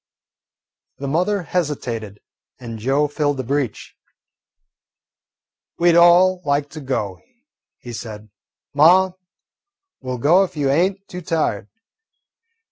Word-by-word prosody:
The 140 - -5
mother 180 +7 0
hesitated, 120 - -3 0.4
and 115 -2 -8
Joe 135 +6 +1
filled 145 -1 -1
the 130 - -3
breach. 135 -3 -3 1.8
"We 175 0 +4
'd - - +2
all 175 +2 +5
like 145 -1 -1
to 155 - -8
go," 110 -9 -3 0.6
he 120 - -10
said. 110 -2 -8 0.4
"Ma, 180 +6 +5 0.9
we' 130 -1 -5
ll 125 - -3
go 165 +10 +4
if 180 - -6
you 140 -2 +1
ain't 190 +6 0
too 180 - -8
tired." 150 - -2
145 Hz, 120 wpm, -20 LUFS, 125-175 Hz, 1.8 s, all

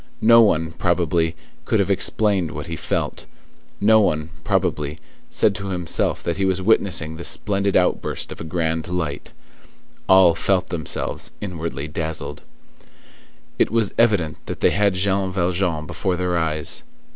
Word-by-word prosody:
No 115 +1 +8
one, 80 -7 +2
probably, 85 -1 0 0.3
could - - +1
have - - +1
explained 100 -7 +1
what 75 +1 -5
he 85 - -5
felt; - - -3 0.5
no 110 +2 +5
one, 80 -4 0
probably, 75 -1 -1 0.3
said 105 - +2
to 100 0 -6
himself 90 -3 0
that 85 - -2
he 100 - 0
was 95 -1 +1
witnessing 90 -6 +1
the 85 - -7
splendid 100 0 0
outburst 90 - 0
of - - -8
a - - -4
grand 80 0 -2
light: 85 -5 -3 0.8
all 95 -2 +7
felt 95 +2 0
themselves 80 -3 -2
inwardly 80 -7 -4
dazzled. 80 -1 -4 1.2
It - - +3
was 115 -2 +1
evident 100 -10 +2
that - - -6
they - - +4
had 100 -2 +2
Jean 95 0 0
Valjean 85 -3 -1
before 95 +3 -2
their 90 0 -1
eyes. 80 -2 -1
90 Hz, 145 wpm, -21 LUFS, 80-95 Hz, 1.2 s, No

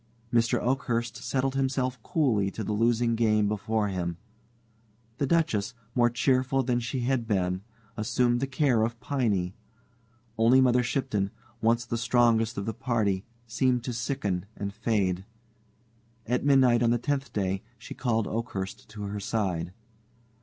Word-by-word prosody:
Mr. 115 0 +3
Oakhurst 120 -2 -1
settled 135 0 -1
himself 130 -2 -1
coolly 110 -9 +1
to 110 - -5
the 105 - -2
losing 115 +2 +2
game 110 -2 +2
before 105 0 0
him. 85 -3 -3 1.0
The 140 - +1
Duchess, 125 -10 +1 0.2
more 120 -1 +4
cheerful 130 +2 +2
than 120 -1 +1
she 120 +2 -3
had 120 -2 0
been, 90 -3 0 0.3
assumed 120 +2 +1
the 135 - -1
care 130 -4 +2
of 115 +1 -1
Piney. 110 -9 0 0.9
Only 120 +4 +6
Mother 125 -1 +4
Shipton 120 -5 -1 0.3
once 115 +1 +2
the 115 0 -2
strongest 115 -2 +2
of 100 - -2
the 110 - -2
party 110 -5 0 0.2
seemed 125 +1 +1
to 125 - -3
sicken 110 -7 -2
and 100 0 -4
fade. 100 -4 0 1.0
At 125 +2 0
midnight 130 -4 +5
on 120 - +3
the 120 - +3
tenth 140 +3 -2
day 95 -1 -1 0.2
she - - -9
called 115 -3 0
Oakhurst 105 -3 -4
to 105 -1 -7
her 100 0 -4
side. 95 -5 -1
115 Hz, 145 wpm, -28 LUFS, 105-125 Hz, 1.0 s, Only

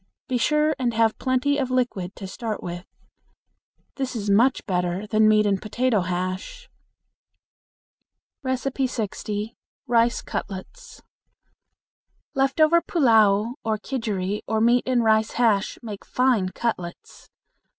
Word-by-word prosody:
Be 255 -2 0
sure 300 +4 +2
and 240 -3 0
have 225 -1 +2
plenty 260 +2 +1
of 265 -2 -1
liquid 240 -8 -1
to 195 - -8
start 215 +3 -5
with. 175 +1 -6 1.1
This 265 -2 -3
is 205 -3 -1
much 240 +6 +3
better 180 0 -1
than 215 0 +3
meat 215 0 +4
and 195 -2 +1
potato 225 0 0
hash. 185 - -4 1.8
60. 240 -5 -2 0.3
Rice 235 0 +2
Cutlets. 475 - -7 1.3
Left 270 +2 0
over 325 +2 +5
pullao 225 - +3
or 220 -1 0
kidgeri 210 -5 -3
or 220 0 0
meat 240 +3 +3
and 250 -2 +2
rice 220 0 +2
hash 220 -4 +1
make 210 -3 -7
fine 250 -7 +1
cutlets. 185 -5 -5
225 Hz, 120 wpm, -24 LUFS, 205-255 Hz, 1.8 s, over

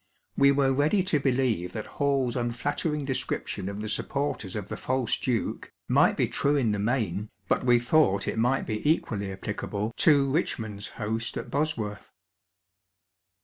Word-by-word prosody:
We 140 0 +5
were 135 -1 +3
ready 150 +8 +2
to 165 -5 +1
believe 125 -9 0
that 110 -2 -4
HalPs 140 -4 +1
unflattering 140 +5 -1
description 125 -7 -2
of 100 +1 -5
the 110 - -4
supporters 110 -2 -2
of 105 -3 -3
'^ - - -19
the - - -5
false 130 -2 0
duke'' 125 -4 -2 0.2
might - - +4
be - - +2
true 145 +1 +1
in 125 -6 +2
the 105 - -1
main, 105 -3 -1 0.2
but - - +1
we 120 -1 +6
thought 120 -5 +2
it - - -1
might 125 +4 +2
be 110 -1 -3
equally 100 -10 -1
applicable 105 +2 -4
to 140 -4 +4
Bichmond's 110 - -2
host 115 +1 -2
at - - -6
Bosworth. 120 -9 -2
120 Hz, 160 wpm, -27 LUFS, 105-140 Hz, 0.2 s, we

